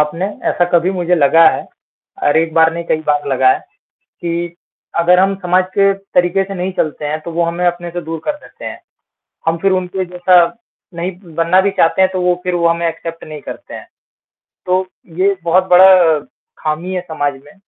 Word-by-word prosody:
आपने 150 +5 0 0.2
ऐसा 175 - +2
कभी 175 +2 +3
मुझे 180 -2 0
लगा 165 +1 +5
है - - -6 0.6
और 145 - +2
एक 165 0 0
बार 160 0 +4
नहीं 170 0 -5
कई 155 - 0
बार 145 -1 +1
लगा 130 -1 +3
है - - -2 0.6
कि 170 0 -3 0.4
अगर 175 +2 +4
हम 195 +1 +2
समाज 180 +1 +2
के 195 0 +4
तरीके 195 -1 0
से 195 +1 -7
नहीं 185 0 -3
चलते 150 -1 -2
हैं, 155 +1 -3
तो 170 - -8
वो 170 +1 0
हमें 170 +1 -2
अपने 175 0 -2
से 175 +1 -4
दूर 165 +1 -5
कर - - 0
देते 295 - -14
हैं। - - -7 0.7
हम 165 +1 +2
फिर 195 - +2
उनके 185 0 -1
जैसा 180 +1 +1 0.6
नहीं 170 +2 -3 0.2
बनना 170 +3 +3
भी 200 +1 +1
चाहते 190 -1 +2
हैं 190 - +4
तो 185 -1 -2
वो 180 0 +2
फिर 180 -1 -1
वो 170 -1 +2
हमें 170 0 0
एक्सेप्ट 165 0 -6
नहीं 155 -1 -9
करते - - -9
हैं। - - -9 0.8
तो 185 +1 +1 0.3
ये 195 +1 +2
बहुत 180 +2 +3
बड़ा 180 -3 +6 0.4
खामी 160 +4 -3
है 180 - -1
समाज 145 -5 -2
में 145 - -17
175 Hz, 200 wpm, -16 LUFS, 165-185 Hz, 0.8 s, बड़ा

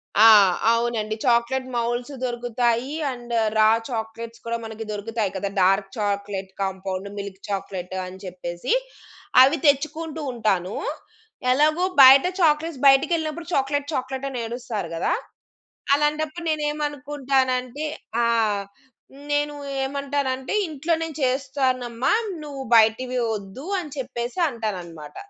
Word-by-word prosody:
ఆ! 220 +2 +8 0.5
అవునండి. 230 -2 -1
Chocolate 245 +2 +2
moulds 240 +3 -2
దొరుకుతాయి 240 +1 0 0.2
అండ్ 240 -1 -7 0.2
రా 215 0 +6 0.2
చాక్లేట్స్ 230 0 -5
కూడా 230 0 -1
మనకి 220 0 -6
దొరుకుతాయి 210 0 -2
కదా! 195 +1 -2
Dark 195 +2 +3
chocolate 200 -2 -2
compound, 190 0 -3
milk 200 -1 -6
chocolate 190 -2 -4
అని 185 +1 -10
చెప్పేసి. 175 - -3 0.7
అవి 275 +5 +6
తెచ్చుకుంటూ 310 +2 +1
ఉంటాను. 200 -5 0 0.8
ఎలాగో 310 +6 +3 0.2
బయట 270 +2 +9 0.2
చాక్లేట్స్ 310 -2 +2
బయటికెళ్ళినప్పుడు 315 +4 +2
చాక్లేట్ 285 +1 0
చాక్లేట్ 265 0 -3
అని 255 -2 -4
ఏడుస్తారు 225 -6 -4
కదా! 165 - 0 0.8
అలాంటప్పుడు 300 +3 -1
నేనేమనుకుంటానంటే 285 -3 -1 0.4
ఆ! - - +2 1.0
నేను 290 0 +1 0.3
ఏమంటానంటే 275 -1 -2 0.2
"ఇంట్లోనే 320 +2 -1
చేస్తానమ్మా. 260 -2 0 0.3
నువ్వు 285 -2 -6
బయటివి 230 +3 +3 0.2
వద్దు" 205 - -8
అని 335 -5 -5
చెప్పేసి 250 +2 -4
అంటానన్నమాట. 180 - -6
250 Hz, 105 wpm, -23 LUFS, 215-285 Hz, 1.0 s, బయట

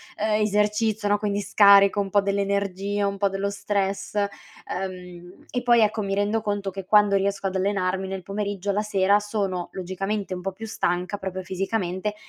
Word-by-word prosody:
ehm, 215 0 0
esercizio, 210 +1 +1
no, 205 - +3
quindi 205 -1 -1
scarico 200 0 +6
un 200 -1 -1
po' 205 - +4
dell'energia, 200 0 -1
un 200 0 -3
po' 200 0 +2
dello 195 +1 -2
stress, 200 -1 -2
uhm, 180 -3 -6
e 245 - -2
poi, 240 -1 +5
ecco, 215 0 +2
mi 195 0 -2
rendo 205 +2 0
conto 205 -2 -2
che 195 0 -7
quando 205 0 +4
riesco 195 0 0
ad 190 - -4
allenarmi 190 -1 0
nel 190 -1 -5
pomeriggio, 200 0 -3
la 205 +1 0
sera 200 -1 +3
sono, 200 -4 -3
logicamente, 195 +2 -3
un 180 - -5
po' 195 +1 -3
più 225 +4 -8
stanca 180 -1 -1
proprio 190 -1 -5
fisicamente, 190 +1 -2
200 Hz, 175 wpm, -24 LUFS, 190-205 Hz, -, scarico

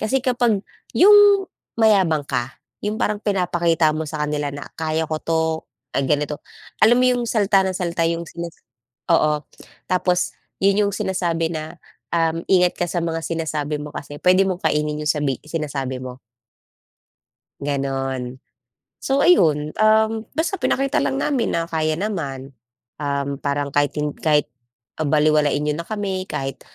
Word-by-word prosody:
Kasi 250 +4 0
kapag 240 -6 +1 0.3
'yong 410 0 +7 0.3
mayabang 195 -9 +3
ka, 125 -2 -3 0.3
'yong 210 - -1
parang 210 0 0
pinapakita 175 -5 +1
mo 155 +1 -3
sa 150 0 -4
kanila 150 -1 -2
na, 145 - -7 0.2
"Kaya 160 0 -1
ko 155 - -1
'to. 165 +1 0 0.5
Ay, 135 0 -1
ganito." 150 +1 0 0.4
Alam 240 +3 +5
mo - - +4
'yong 245 -1 0
salita 200 -4 +3
nang 185 - -2
salita 170 -2 -1
'yong 170 0 -1
sinisis 170 -1 -8 0.5
oo. 150 -2 +3 0.5
Tapos 180 -1 +1 0.2
'yon 200 +1 +4
'yong 200 - -2
sinasabi 170 -4 -1
na, 160 0 -6 0.3
uhm, 165 0 0
ingat 180 -2 +3
ka 175 - 0
sa 175 0 -2
mga 165 -1 -2
sinasabi 155 -3 -2
mo 150 - -7
kasi 145 0 -8
puwede 185 +1 +5
mong 185 +1 -3
kainin 150 0 0
'yong 150 - +1
sabi 145 -4 -1
sinasabi 140 -5 -4
mo. 130 0 -8 1.4
Gano'n. 135 -2 -2 0.6
So, 270 +1 +1
ayun, 155 - +4
uhm 220 0 +4 0.2
,basta 340 +4 -1
pinakita 275 0 +1
lang 270 - 0
namin 275 -4 0
na 165 - -1
kaya 155 -1 -1
naman. 140 -10 -4 0.5
Uhm, 140 -1 -2
parang 140 0 -2
kahit 145 +1 +1
hin 150 -1 -1
kahit, 150 -2 +2 0.6
ah, 155 - 0
balewalain 150 -1 +3
n'yo 150 - +1
na 165 - -4
kami. 190 -1 -4
Kahit 135 0 -4
165 Hz, 155 wpm, -21 LUFS, 150-195 Hz, 1.4 s, yong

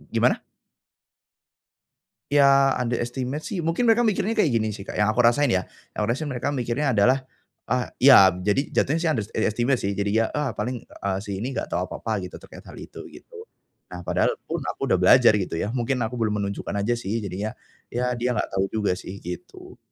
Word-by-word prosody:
gimana? - - +2 1.9
Ya, 140 -1 +5
underestimate 125 +4 -3
sih 185 -6 -3
mungkin 165 +10 0
mereka 230 +1 +4
mikirnya 215 0 +1
kayak 210 -9 +2
gini 110 -3 0
sih, 100 - -8
Kak, - - -7
yang 105 - +3
aku 125 - +3
rasain 120 +5 +4
ya, 95 -5 +1 0.3
yang - - -13
aku 105 - 0
rasain 145 +6 -2
mereka 130 0 -2
mikirnya 130 +1 -1
adalah, 125 +5 +3 0.5
ah 125 +1 +1 0.2
iya 100 -10 +8
jadi 105 +10 0
jatuhnya 155 +4 +2
sih 165 -1 +1
underestimate 115 +3 0
sih 100 0 -2
jadinya, 105 +3 +1
"Ah, 150 -2 0
paling 120 +2 -3
eee, 95 -1 -4
si 100 -2 -5
ini 130 +6 -4
enggak - - -4
tahu - - -1
apa-apa - - -3
gitu - - -12
terkait - - -13
hal - - -11
itu," - - -11 0.2
gitu. 455 -2 -12 0.4
Nah, - - -9
padahal 475 - +1
pun 165 - -4
aku - - -5
udah 95 - +4
belajar 110 +3 +6
gitu 95 -4 -3
ya, 100 +5 -2
mungkin 125 +1 -1
aku 120 +2 -3
belum 105 -2 0
menunjukkan 100 0 -4
aja 120 +4 +1
sih 105 -2 -4
jadinya, 100 +4 -4 0.4
ya 125 +1 0
dia 125 +1 0
enggak - - -2
tahu 95 0 0
juga 100 -4 0
sih, 100 +2 -9
gitu. 90 +1 -9
120 Hz, 195 wpm, -24 LUFS, 105-140 Hz, 1.9 s, iya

